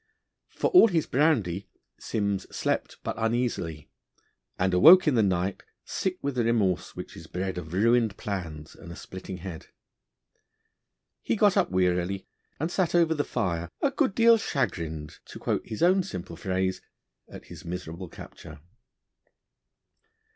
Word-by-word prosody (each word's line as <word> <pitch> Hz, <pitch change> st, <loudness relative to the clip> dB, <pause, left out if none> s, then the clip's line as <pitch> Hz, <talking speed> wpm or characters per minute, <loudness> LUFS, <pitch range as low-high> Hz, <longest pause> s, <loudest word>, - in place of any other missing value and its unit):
For -, -, -1 dB
all 360 Hz, -10 st, +8 dB
his 170 Hz, -7 st, 0 dB
brandy 105 Hz, -, +1 dB, 0.3 s
Simms 100 Hz, -3 st, -2 dB
slept -, -, -2 dB
but -, -, -2 dB
uneasily, 115 Hz, -10 st, -1 dB, 0.7 s
and 95 Hz, 0 st, +1 dB
awoke 165 Hz, -, +8 dB
in 150 Hz, -, +4 dB
the 115 Hz, -, +4 dB
night 95 Hz, -1 st, 0 dB, 0.2 s
sick 185 Hz, -1 st, -2 dB
with 140 Hz, 0 st, -1 dB
the 125 Hz, -2 st, 0 dB
remorse 105 Hz, -6 st, 0 dB
which -, -, -8 dB
is 80 Hz, -, -11 dB
bred 90 Hz, +2 st, -3 dB
of 80 Hz, -3 st, -9 dB
ruined 115 Hz, +4 st, +2 dB
plans 85 Hz, -8 st, -5 dB
and 85 Hz, -, -11 dB
a -, -, -8 dB
splitting 95 Hz, +1 st, -8 dB
head. 90 Hz, -3 st, -8 dB, 1.5 s
He -, -, 0 dB
got -, -, +4 dB
up -, -, +2 dB
wearily, 90 Hz, +1 st, 0 dB, 0.3 s
and 160 Hz, +4 st, -2 dB
sat 180 Hz, -2 st, 0 dB
over 165 Hz, -2 st, +4 dB
the 145 Hz, -2 st, 0 dB
fire 85 Hz, -10 st, -2 dB
'a 280 Hz, -, +1 dB
good 275 Hz, -7 st, 0 dB
deal 230 Hz, -1 st, +6 dB
chagrined,' 80 Hz, -, -3 dB
to -, -, -10 dB
quote -, -, -2 dB
his 110 Hz, -, -3 dB
own 185 Hz, +2 st, +5 dB
simple 90 Hz, -, -7 dB
phrase, 95 Hz, +1 st, -2 dB, 0.5 s
at -, -, -11 dB
his -, -, -11 dB
miserable 90 Hz, 0 st, -6 dB
capture. 80 Hz, -1 st, -11 dB
95 Hz, 145 wpm, -27 LUFS, 90-140 Hz, 1.5 s, all